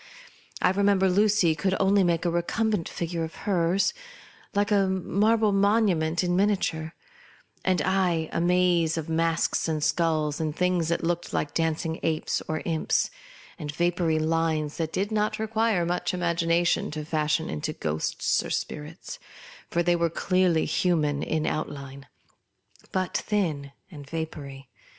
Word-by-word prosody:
I - - +5
re 195 +2 -1
member 200 -1 +4
Lucy 200 -3 +3
could 190 +4 0
only 195 0 +4
make 170 -1 +1
a 170 - +2
recumbent 190 +2 0
figure 170 -1 -3
of 160 - -6
her's, 185 -1 +2 0.6
like 205 +1 +1
a 200 -2 +4
marble 210 +4 +2
monument 195 -5 +2
in 175 0 +1
miniature; 180 -5 0 0.7
and 185 -1 +2
T, 150 - -1
a 180 -4 +1
maze 175 -2 +2
of 160 0 -4
masks 165 +1 +1
and 155 -2 -1
sculls 155 -3 +1
and 155 -1 -2
things 180 -2 +1
that 170 +1 -1
looked 175 +1 -2
like 145 - -1
dancing 160 0 -1
apes 160 -1 -1
or 155 0 -3
imps, 160 -2 0 0.5
and 150 -1 -4
vapoury 170 0 +1
lines 160 -1 0
that 160 -1 -2
did 200 +3 -1
not 215 0 0
require 220 -4 +1
much 175 +1 -1
imagination 170 0 +1
to 150 0 -5
fashion 155 0 0
into 75 -1 -3
ghosts 80 +1 -1
or - - -6
spirits; 160 - -5 0.5
for 170 - +1
they 175 0 +3
were 170 -1 +1
clearly 180 -1 +1
human 150 -5 +1
in 160 -1 -1
the - - +1
outline, 140 -3 -5 0.8
but 185 -1 -2
thin 160 -10 -1 0.2
and 145 -4 -11
vapoury. 140 -4 -6
170 Hz, 150 wpm, -26 LUFS, 160-190 Hz, 0.8 s, I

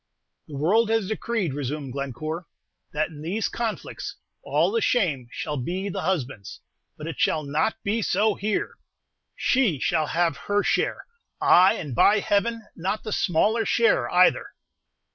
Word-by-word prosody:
"The 150 - -8
world 210 +10 +3
has 225 -3 +1
decreed," 220 - -2
resumed 140 -1 -4
Glencore, 140 +5 -4 0.4
"that 155 +1 -1
in 150 -2 -11
these 190 +8 -1
conflicts 230 -3 -4 0.3
all - - +1
the 460 +1 0
shame 155 - +1
shall 150 +3 -4
be 180 +10 -3
the - - -4
husband's; 135 - -3 0.4
but 150 - -8
it 165 -3 -6
shall 155 - +2
not 150 +10 0
be 215 +3 0
so 210 +2 +2
here! 205 +1 -2 0.6
She 245 - +2
shall 155 +3 0
have 165 -1 +1
her 205 0 +2
share, - - 0 0.3
ay, 185 +2 +6
and, 145 -6 -5
by 205 - +5
Heaven, 225 +3 0
not 190 +5 -2
the 215 - -5
smaller 210 +7 +2
share 470 - +2
either!" - - +4
180 Hz, 150 wpm, -25 LUFS, 150-215 Hz, 0.6 s, ay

